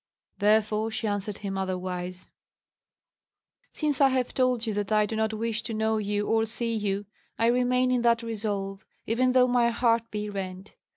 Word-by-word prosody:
Therefore 215 +1 +2
she 225 - -3
answered 205 -1 -2
him 195 -1 -4
otherwise: 185 -1 -4 1.4
"Since 295 -3 -1
I 275 - +7
have 260 -2 -1
told 250 -2 +1
you 220 - -1
that 205 0 -2
I 215 0 +4
do 220 - -4
not 220 0 +1
wish 225 0 -2
to 225 - -5
know 220 0 +1
you 205 0 -1
or 225 +1 +2
see 230 +1 -2
you, 205 -2 -1 0.3
I 230 - +2
remain 250 +1 +3
in 250 -1 +2
that 235 0 +3
resolve, 205 -3 -3 0.2
even 250 +3 +2
though 255 -1 +6
my 245 -1 +3
heart 230 -1 +1
be 210 0 -4
rent. 195 -1 -6
220 Hz, 175 wpm, -27 LUFS, 205-235 Hz, 1.4 s, I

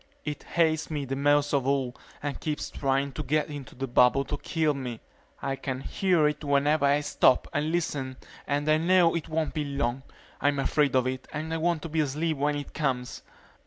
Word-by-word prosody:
It 150 -1 -4
hates 160 -2 +1
me 150 -3 -2
the 135 +1 -3
most 145 +1 +2
of 135 -2 +1
all 135 -2 0 0.3
and 145 -3 -3
keeps 150 -2 -3
trying 135 0 0
to 155 - -5
get 150 +3 0
into 145 -3 -8
the 135 - -3
bubble 125 +2 +4
to - - -3
kill 155 -2 0
me. 125 -5 -5 0.4
I 135 - -1
can 130 -1 -4
hear 175 -1 +2
it 150 +1 -3
whenever 140 +1 +3
I 145 +1 +3
stop 130 -3 +3
and 150 +2 0
listen 140 -6 -2 0.3
and 145 +1 0
I 155 0 +5
know 175 +1 +4
it 165 -1 -3
won't 160 0 -1
be 155 - -1
long. 140 -3 -2 0.4
I'm 145 0 +2
afraid 140 0 +2
of 130 -1 +3
it 130 0 -3
and 155 +1 -4
I - - 0
want 165 -1 0
to 165 - -5
be 160 +1 -1
asleep 155 +2 0
when 145 +1 +1
it 145 -1 -6
comes. 130 -5 -2
145 Hz, 205 wpm, -27 LUFS, 135-155 Hz, 0.4 s, I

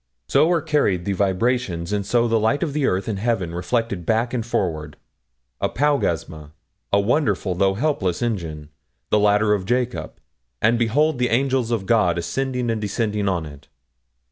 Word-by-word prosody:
So 150 +4 +4
are 170 -4 +1
carried 140 - +1
the 100 - 0
vibrations, 95 -2 0
and 100 -1 0
so 120 +4 +2
the 115 -1 +2
light 110 +9 +1
of 150 -4 -3
earth 100 -10 0
and 105 -4 -2
heaven 100 -7 -1
reflected 100 +1 -2
back 115 +6 0
and 120 -3 -1
forward 80 -9 -2 0.6
apaugasma, 85 - -1 0.4
a 100 - +4
wonderful 105 -3 +1
though 95 +1 +1
helpless 120 - -1
engine, 80 -10 -3 0.4
the 105 - +4
ladder 105 +1 +3
of 95 -2 -2
Jacob, 125 +1 -1 0.5
and 115 +2 +2
behold 135 +5 +2
the 125 - +1
angels 130 -1 +1
of 115 -5 -1
God 100 -6 +2
ascending 125 +7 -2
and 110 -1 -2
descending 105 -1 -1
on 85 -4 -1
it. 70 -2 -12
110 Hz, 160 wpm, -22 LUFS, 95-125 Hz, 0.6 s, So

